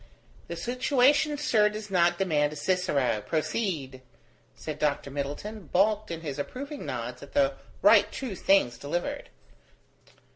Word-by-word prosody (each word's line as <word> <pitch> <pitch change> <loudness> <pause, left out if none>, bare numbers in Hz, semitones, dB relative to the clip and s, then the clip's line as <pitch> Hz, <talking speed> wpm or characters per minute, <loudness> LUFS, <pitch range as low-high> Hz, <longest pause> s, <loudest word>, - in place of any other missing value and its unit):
"The 170 - -5
situation, 260 - +2
sir, 220 -8 +3
does 210 -1 -7
not 175 -1 +3
demand 150 -6 +1
a - - -8
Cicero: 145 - 0
proceed," 155 - -2 0.5
said 155 -2 -6
Dr. 145 -2 0
Middleton, 145 +8 -5
balked 210 +5 +2
in 165 -1 -5
his 145 -3 -5
approving 280 - -6
nods 125 0 -5
at - - -12
the 280 -1 +3 0.3
right - - +6
true 260 -6 -5
things 170 -11 +2
delivered. 175 - -3
180 Hz, 135 wpm, -28 LUFS, 145-220 Hz, 0.5 s, right